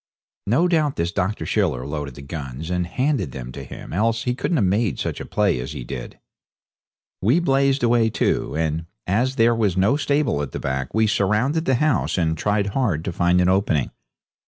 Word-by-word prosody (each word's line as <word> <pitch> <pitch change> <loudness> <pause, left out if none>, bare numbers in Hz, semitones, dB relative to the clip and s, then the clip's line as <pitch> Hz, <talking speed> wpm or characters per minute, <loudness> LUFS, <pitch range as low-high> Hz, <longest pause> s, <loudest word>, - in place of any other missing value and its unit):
No 130 - +3
doubt 155 -5 +1
this 85 +1 -1
Dr. 100 +2 -2
Schiller 65 0 0
loaded 75 -3 -5
the 70 - -10
guns 70 +1 -6
and 90 -1 0
handed 125 - -1
them 65 -1 -7
to - - -8
him, - - -9
else 115 +4 +1
he 125 - 0
couldn't 160 +6 -1
have 105 - +3
made 100 +2 +1
such - - -3
play 100 -9 +1
as 60 - -5
he - - -6
did. - - -7 1.0
We 120 - +3
blazed 135 -4 +2
away 115 -1 +3
too, - - 0
and 80 +1 -1 0.2
as 120 +8 +1
there 115 -1 +4
was 105 -5 0
no 100 +9 +3
stable 145 - +1
at 70 - -5
the - - -3
back 65 -1 -3
we 110 0 +4
surrounded 110 - +1
the 130 - +3
house 150 -4 +1
and 80 -2 +1
tried 105 +4 0
hard 95 - 0
to 95 - -2
find 85 +1 +2
an 90 - +3
opening. 95 - +1
100 Hz, 195 wpm, -22 LUFS, 80-125 Hz, 1.0 s, there